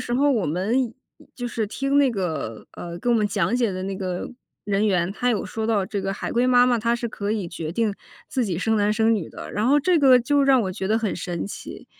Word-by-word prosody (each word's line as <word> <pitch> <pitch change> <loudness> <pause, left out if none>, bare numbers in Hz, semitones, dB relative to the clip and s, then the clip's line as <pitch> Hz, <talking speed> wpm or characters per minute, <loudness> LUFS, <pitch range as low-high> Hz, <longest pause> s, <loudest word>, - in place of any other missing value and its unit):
时 240 - -4
候 275 +4 +3
我 230 -8 +1
们 220 - 0 0.4
就 245 - -4
是 230 -2 -2
听 275 +5 0
那 280 -2 +4
个 160 - -4
呃， 170 0 -7
跟 240 +7 +1
我 - - +4
们 215 - +2
讲 205 +2 0
解 240 -3 +1
的 185 0 -4
那 195 0 -3
个 185 -2 -4 0.4
人 205 +1 +1
员， 180 -2 +1
他 245 +4 0
有 220 - -1
说 220 - -4
到 205 -4 +1
这 200 0 -3
个 195 0 -1
海 195 - -4
龟 245 +2 +2
妈 245 0 +6
妈 240 -2 +2
她 235 +2 +1
是 235 0 -3
可 205 -2 -4
以 210 -4 -1
决 165 -2 -5
定 210 +3 0 0.3
自 255 -3 -1
己 180 -6 -2
生 220 +3 +1
男 205 0 +2
生 225 +1 +3
女 190 -7 -3
的。 - - -9
然 215 +3 0
后 285 +2 +5
这 335 +3 +2
个 260 -3 +7
就 280 +4 +2
让 270 -2 +5
我 190 -2 -2
觉 190 0 -4
得 220 +1 +3
很 220 -3 -1
神 175 -1 -4
奇， 200 - -9
220 Hz, 275 characters per minute, -23 LUFS, 190-245 Hz, 0.4 s, 个